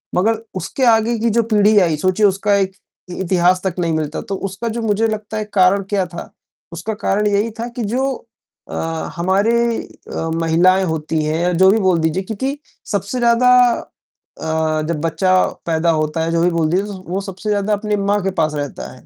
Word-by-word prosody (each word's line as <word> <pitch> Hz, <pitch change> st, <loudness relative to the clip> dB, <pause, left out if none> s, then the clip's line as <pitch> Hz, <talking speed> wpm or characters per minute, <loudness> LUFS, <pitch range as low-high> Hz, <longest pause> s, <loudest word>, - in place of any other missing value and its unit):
मगर 220 Hz, +4 st, +1 dB
उसके 260 Hz, +7 st, -3 dB
आगे 230 Hz, 0 st, +3 dB
की 230 Hz, +1 st, +1 dB
जो 230 Hz, +1 st, +2 dB
पीढ़ी 210 Hz, +1 st, +4 dB
आई 165 Hz, -5 st, +2 dB
सोचिए 185 Hz, +5 st, +2 dB
उसका 200 Hz, +1 st, +2 dB
एक 190 Hz, -1 st, 0 dB, 0.4 s
इतिहास 180 Hz, 0 st, +1 dB
तक 190 Hz, -3 st, -2 dB
नहीं 165 Hz, -2 st, 0 dB
मिलता 155 Hz, -1 st, -2 dB
तो 195 Hz, -, -1 dB
उसका 215 Hz, +5 st, -5 dB
जो 230 Hz, +1 st, -3 dB
मुझे 220 Hz, +1 st, +1 dB
लगता 215 Hz, 0 st, -4 dB
है 215 Hz, -, -2 dB
कारण 190 Hz, +1 st, +4 dB
क्या 195 Hz, -3 st, +1 dB
था? 170 Hz, 0 st, -9 dB, 0.4 s
उसका 190 Hz, +7 st, -4 dB
कारण 210 Hz, 0 st, 0 dB
यही 205 Hz, +2 st, +1 dB
था 235 Hz, -, -2 dB
कि 235 Hz, -, -1 dB
जो 260 Hz, +6 st, 0 dB, 0.6 s
अ, -, -, -6 dB, 0.4 s
हमारी 190 Hz, +6 st, +1 dB, 0.3 s
अ, 165 Hz, -, -7 dB
महिलाएँ 175 Hz, +3 st, +3 dB
होती 160 Hz, -1 st, -2 dB
हैं 155 Hz, +1 st, 0 dB
या 180 Hz, +1 st, +1 dB
जो 190 Hz, 0 st, +7 dB
भी 220 Hz, -, +3 dB
बोल 185 Hz, -4 st, +2 dB
दीजिए 160 Hz, +4 st, 0 dB
क्योंकि 260 Hz, +8 st, -3 dB, 0.3 s
सबसे 200 Hz, +5 st, -2 dB
ज़्यादा 240 Hz, +1 st, +4 dB, 0.9 s
अ, 160 Hz, -1 st, 0 dB
जब 165 Hz, -3 st, -2 dB
बच्चा 165 Hz, +3 st, +1 dB, 0.3 s
पैदा 165 Hz, 0 st, +1 dB
होता 155 Hz, +1 st, -1 dB
है 165 Hz, -, -1 dB
जो 170 Hz, 0 st, +1 dB
भी 180 Hz, -, +4 dB
बोल 165 Hz, -2 st, 0 dB
दिए 190 Hz, +3 st, +2 dB
तो 205 Hz, -, -6 dB
वो 190 Hz, +3 st, -2 dB
सबसे 195 Hz, +2 st, -6 dB
ज़्यादा 205 Hz, 0 st, +1 dB
अपने 210 Hz, 0 st, -1 dB
माँ 200 Hz, +1 st, +1 dB
के 195 Hz, -, 0 dB
पास 155 Hz, -1 st, +1 dB
रहता 145 Hz, -1 st, -5 dB
है। -, -, -17 dB
190 Hz, 200 wpm, -18 LUFS, 170-215 Hz, 0.9 s, जो